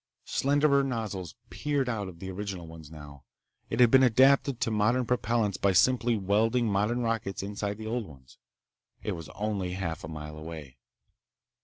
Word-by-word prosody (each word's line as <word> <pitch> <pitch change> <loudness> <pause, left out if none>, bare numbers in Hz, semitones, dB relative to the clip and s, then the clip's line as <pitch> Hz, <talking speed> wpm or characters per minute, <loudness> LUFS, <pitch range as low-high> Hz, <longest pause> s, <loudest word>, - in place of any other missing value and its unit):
Slenderer 140 0 +2
nozzles 110 -9 -4 0.2
peered 145 -3 -1
out 110 -5 -2
of 90 -2 -10
the 95 +2 -6
original 95 -2 -5
ones 80 -2 -11
now. 75 -3 -12 0.5
It 115 - -3
had 120 -2 +6
been 130 - +7
adapted 130 +1 +4
to 115 - +1
modern 115 +4 +2
propellants 115 -4 0
by 100 -1 +3
simply 120 +4 +3
welding 110 +5 +2
modern 105 +4 +1
rockets 115 -5 -2
inside 100 0 -4
the 110 - -8
old 115 -1 -2
ones. 65 -3 -17 0.6
It - - -2
was 80 -3 -6
only 100 -4 -2
half 85 -4 -4
a - - -5
mile 75 -1 -7
away. 75 -5 -9
105 Hz, 165 wpm, -28 LUFS, 90-120 Hz, 0.6 s, been